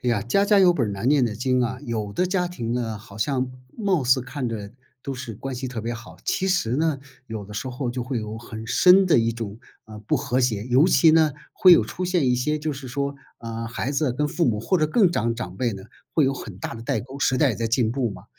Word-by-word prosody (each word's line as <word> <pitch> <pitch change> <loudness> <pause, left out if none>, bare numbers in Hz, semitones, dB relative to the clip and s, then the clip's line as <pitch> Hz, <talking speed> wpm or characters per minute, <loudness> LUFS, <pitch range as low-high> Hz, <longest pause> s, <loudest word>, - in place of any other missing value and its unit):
哎 125 - +2
呀， 105 -4 +1
家 165 - +2
家 205 0 +4
有 185 -2 +6
本 130 -9 0
儿 - - -3
难 100 +5 -2
念 140 -2 +4
的 115 -3 -2
经 125 +3 +1
啊， 120 +1 -2
有 110 -3 -3
的 180 - +1
家 180 -1 0
庭 120 -10 -4
呢， 115 -3 -2
好 100 -1 -14
像 130 +3 0 0.3
貌 195 - +1
似 130 +1 +4
看 130 0 -4
着 105 -2 -6 0.3
都 135 - -4
是 130 -3 -7
关 135 +6 -6
系 125 +1 -4
特 120 -2 -5
别 115 +2 -3
好， 120 +1 -11
其 190 - 0
实 155 -11 +1
呢， 155 -1 +1 0.3
有 110 -3 -6
的 105 +1 -11
时 130 +5 -3
候 125 0 -3
就 125 0 -3
会 125 -1 -3
有 110 0 -5
很 110 -1 -8
深 185 +9 +6
的 165 -9 +5
一 115 0 +1
种， 110 -2 -6 0.3
啊， 110 -1 -11
不 105 - 0
和 125 +2 0
谐， 110 -5 0
尤 130 +6 +4
其 165 -3 +5
呢， 155 -2 +4 0.2
会 185 - +7
有 - - +6
出 185 - -5
现 180 -6 +1
一 125 - +3
些 150 +5 0
就 155 0 -2
是 135 -1 -8
说， 140 +2 -2 0.2
啊， 115 -1 -5
孩 125 +3 -3
子 140 -2 0
跟 150 +4 0
父 170 +3 0
母 105 -5 +1
或 185 +10 +1
者 155 - +2
更 185 +2 +3
长 115 -8 0
长 95 -6 -6
辈 120 -3 0
呢， 95 -1 -8 0.3
会 155 - +3
有 135 +1 +1
很 105 -8 -9
大 105 - -5
的 115 - -8
代 115 - -1
沟， 130 +5 -10
时 130 -2 +2
代 145 -4 +4
也 110 - -4
在 115 - -1
进 115 0 +1
步 120 -2 -1
嘛， - - -10
125 Hz, 285 characters per minute, -24 LUFS, 115-150 Hz, 0.3 s, 会